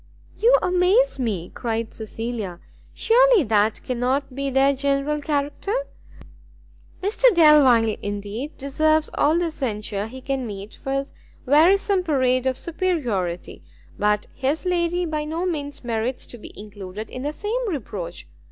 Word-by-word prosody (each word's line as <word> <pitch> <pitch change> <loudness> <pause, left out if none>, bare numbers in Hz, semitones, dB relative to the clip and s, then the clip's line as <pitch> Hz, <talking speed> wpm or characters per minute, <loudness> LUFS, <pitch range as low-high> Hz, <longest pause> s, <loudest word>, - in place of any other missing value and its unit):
"You 485 +3 +5
amaze 365 - +3
me!" 205 -9 -2
cried 230 -2 -3
Cecilia; 220 -4 -5 0.3
"surely 485 -4 +4
that 215 -2 +1
cannot 255 +2 -1
be 275 +1 -2
their 270 +1 +3
general 280 +2 0
character? 295 +8 -2 1.3
Mr 425 +5 0
Delvile, 270 -9 +6
indeed, 205 +8 -5
deserves 310 +3 +1
all 310 +3 +3
the 340 -1 0
censure 210 -7 -3
he 260 +3 -9
can 265 -1 -3
meet 200 0 -7
for 270 - -5
his 275 0 -2 0.3
wearisome 370 +8 +4
parade 260 -6 +1
of 260 -1 0
superiority; 245 - -2 0.4
but 210 0 +1
his 280 +7 -2
lady 350 0 0
by 305 -2 -2
no 325 +4 -3
means 290 -6 -4
merits 235 +2 -2
to 240 - -9
be - - -10
included 205 0 -8
in 255 - -6
the 290 +2 -2
same 440 +8 -2
reproach. 195 - -5
275 Hz, 135 wpm, -23 LUFS, 225-320 Hz, 1.3 s, Delvile